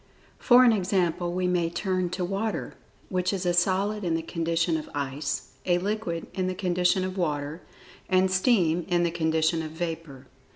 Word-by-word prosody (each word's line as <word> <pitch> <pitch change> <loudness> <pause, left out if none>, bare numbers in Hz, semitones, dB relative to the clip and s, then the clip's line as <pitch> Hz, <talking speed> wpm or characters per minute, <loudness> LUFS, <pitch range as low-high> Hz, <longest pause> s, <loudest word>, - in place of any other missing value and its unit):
For 250 0 +6
an 245 - +6
example 180 -3 0
we 180 +1 -1
may 175 -2 +1
turn 185 0 -1
to 180 0 -2
Water, 200 +4 -3 0.4
which 185 -1 0
is 195 -2 -3
a 175 - +2
solid 195 +4 +1
in 170 -2 0
the 165 - -2
condition 165 0 0
of 155 - -4
ice; 140 +1 -3 0.2
a 175 -1 +4
liquid 185 -3 -2
in 185 -1 -1
the 185 - -2
condition 180 0 +1
of 185 +1 -4
water; 150 0 -2 0.5
and 185 0 +3
steam 185 -4 +2
in 175 -1 +2
the 170 - +1
condition 160 0 +1
of 155 -1 -6
vapor. 160 -5 -5
175 Hz, 175 wpm, -26 LUFS, 165-185 Hz, 0.5 s, For